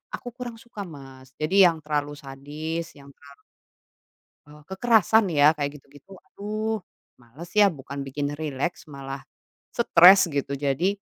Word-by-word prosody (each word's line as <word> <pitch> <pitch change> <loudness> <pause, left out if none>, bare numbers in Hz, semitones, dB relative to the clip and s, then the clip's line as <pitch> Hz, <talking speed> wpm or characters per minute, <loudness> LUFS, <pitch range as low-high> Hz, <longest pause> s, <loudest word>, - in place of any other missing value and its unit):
aku - - -12
kurang 245 -2 -6
suka 235 -3 -9
Mas. 135 -2 -13
Jadi, 155 +5 -1
yang 165 -2 0
terlalu 145 -1 -2
sadis, 150 +4 -6
yang 140 0 -15
terlalu 140 -1 -18 1.0
e - - -18 0.2
kekerasan 220 +2 +3
ya 150 +1 +5
kayak 145 0 -4
gitu-gitu, 145 +7 -19
aduh, 215 +2 -4 0.4
malas 130 +8 -13
ya. 205 -2 +6
Bukan 140 -1 -7
bikin 145 +2 -4
rileks, 150 +1 -4
malah 135 -2 -8 0.5
stres 190 -4 +6
gitu. 140 0 -2
Jadi, 145 +8 0
150 Hz, 135 wpm, -25 LUFS, 140-190 Hz, 1.0 s, ya